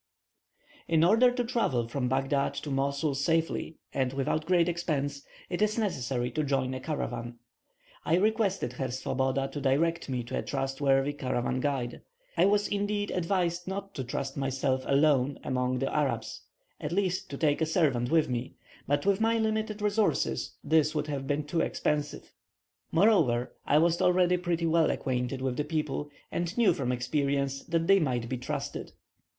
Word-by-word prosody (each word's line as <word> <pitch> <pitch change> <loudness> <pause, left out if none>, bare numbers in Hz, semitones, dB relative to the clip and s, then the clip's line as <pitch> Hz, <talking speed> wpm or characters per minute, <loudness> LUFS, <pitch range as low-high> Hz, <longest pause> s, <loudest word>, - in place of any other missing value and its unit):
In 165 -1 +3
order 225 +8 +6
to 245 0 -1
travel 225 - 0
from 125 +1 -2
Baghdad 135 +1 0
to 145 - -5
Mosul 140 +2 0
safely, 160 +3 0 0.2
and 130 -1 0
without 145 +3 -1
great 175 -2 +4
expense, 145 -5 -1 0.3
it 175 +2 -3
is 215 +1 +2
necessary 130 - -1
to 155 - -1
join 135 -2 0
a 130 - -4
caravan. 120 -5 -4 0.7
I 160 - +2
requested 200 - +1
Herr 130 +1 -3
Swoboda 130 +2 -1
to 145 +1 -5
direct 160 +4 +1
me 125 -2 -1
to 120 - -3
a - - -1
trustworthy 135 +1 0
caravan 130 -2 -1
guide. 130 -3 -2 0.3
I - - +4
was 205 +1 +3
indeed 205 0 -1
advised 175 -1 0
not 195 +1 -5
to 135 - -4
trust 135 +2 -4
myself 135 -1 0
alone 140 -1 +3
among 125 0 0
the 135 +1 -2
Arabs, 115 -7 -1 0.4
at - - -4
least 185 0 0
to 140 - -5
take 150 0 +1
a 160 - +2
servant 140 -8 +1
with 160 0 +3
me; 125 0 -3 0.3
but 145 +3 +1
with 200 +1 +2
my 225 +1 +3
limited 220 -1 -1
resources 205 - 0
this 155 0 +3
would 150 - 0
have 135 -2 -3
been 145 +1 0
too 160 +3 -1
expensive. 150 -1 -2 0.6
Moreover, 160 - +3
I 145 - +4
was 170 +2 +3
already 180 0 +4
pretty 175 -1 -1
well 165 0 +3
acquainted 130 0 -2
with 130 -2 -1
the 150 - +1
people, 150 -1 -2 0.2
and 175 +4 -2
knew 235 -3 +5
from 125 -3 -2
experience 140 +2 -1
that 165 -1 0
they 195 +2 +6
might 125 -7 -1
be 130 +2 -3
trusted. 125 - -5
145 Hz, 165 wpm, -29 LUFS, 130-175 Hz, 0.7 s, order